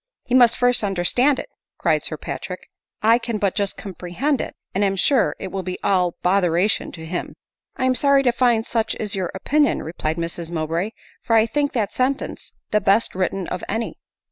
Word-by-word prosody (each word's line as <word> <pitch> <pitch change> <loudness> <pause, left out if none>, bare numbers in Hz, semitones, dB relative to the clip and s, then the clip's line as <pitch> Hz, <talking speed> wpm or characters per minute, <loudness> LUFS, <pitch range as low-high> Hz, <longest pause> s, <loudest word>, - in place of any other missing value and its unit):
"He 245 - -4
must 245 -2 +6
first 245 -2 +3
understand 205 +9 +2
it," - - -5 0.3
cried - - +2
Sir - - -2
Patrick; - - -7 0.2
" - - -55
I 235 - +4
can 235 -2 -3
but 200 -2 0
just 200 -2 -1
comprehend 200 - -2
it, - - -6 0.2
and 200 - +1
am 195 -1 +2
sure 240 +6 +2
it 190 - -6
will 195 - -3
be 185 0 -4
all 180 -3 +2
botheration 180 +1 +2
to 160 -2 -8
him." 175 +2 -4 0.2
" - - -57
I 255 - 0
am 260 - +3
sorry 280 +1 +3
to 245 - +4
find 240 -2 +2
such 225 -2 -1
is 210 -2 -3
your 185 -3 -2
opinion," 290 +9 +1
replied 160 0 -3
Mrs 170 0 -4
Mowbray; 170 +5 -2
" - - -29
for 230 - +2
I 220 0 +5
think 285 +5 -1
that 215 -5 -1
sentence 260 +2 -2 0.2
the 210 - +3
best 200 +4 +3
writ 185 -1 +1
ten 195 -2 -5
of 180 - -4
any." 225 +2 -3
205 Hz, 210 wpm, -22 LUFS, 180-245 Hz, 0.3 s, must